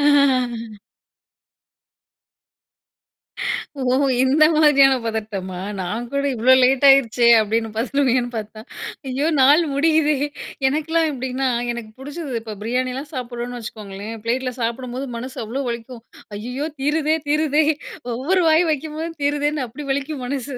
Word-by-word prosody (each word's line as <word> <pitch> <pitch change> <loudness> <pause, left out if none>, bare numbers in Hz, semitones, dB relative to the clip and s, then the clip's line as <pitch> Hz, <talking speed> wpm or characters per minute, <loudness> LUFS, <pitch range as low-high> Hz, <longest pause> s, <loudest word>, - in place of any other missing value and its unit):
ஆ. 250 -6 +2 3.0
ஓ! - - -3 0.4
இந்த 280 +4 +4
மாதிரியான 280 -3 +6
பதட்டமா? 205 -5 -4 0.2
நான் 215 +7 -3
கூட 280 0 -1
இவ்ளோ 250 +3 +5
லேட் 265 +2 +3
ஆயிடுச்சே 245 -3 +4
அப்டின்னு 225 +1 -1
பதறுவீங்கன்னு 250 0 +1
பார்த்தா, 215 0 -7 0.5
ஐயோ 270 +4 -1
நாள் 290 +5 +6
முடியுதே! 305 0 +3 0.5
எனக்குலாம் 320 +3 +1
எப்டின்னா, 260 0 -2 0.2
எனக்கு 235 -2 -7
புடிச்சது, 290 0 -6
இப்ப 220 -2 -7
பிரியாணிலாம் 255 +4 -2
சாப்டுறோம்னு 245 -1 -5
வெச்சுக்கோங்களேன், 215 -1 -7
பிளேட்ல 255 +2 -1
சாப்டும்போது 250 +3 -3
மனசு 255 +2 -7
அவ்ளோ 255 +6 -3
வலிக்கும். 235 0 -7 0.3
ஐயையோ! 250 +8 -4
தீருதே 305 +2 +1
தீருதே! 305 0 +2 0.5
ஒவ்வொரு 345 +10 +1
வாய் 320 +2 +4
வைக்கும் 305 +1 -3
போதும் 325 0 -5
தீருதேன்னு 290 -1 0
அப்டி 270 +6 -9
வலிக்கும் 280 0 -3
மனசு. 270 0 -4
260 Hz, 115 wpm, -21 LUFS, 235-290 Hz, 3.0 s, மாதிரியான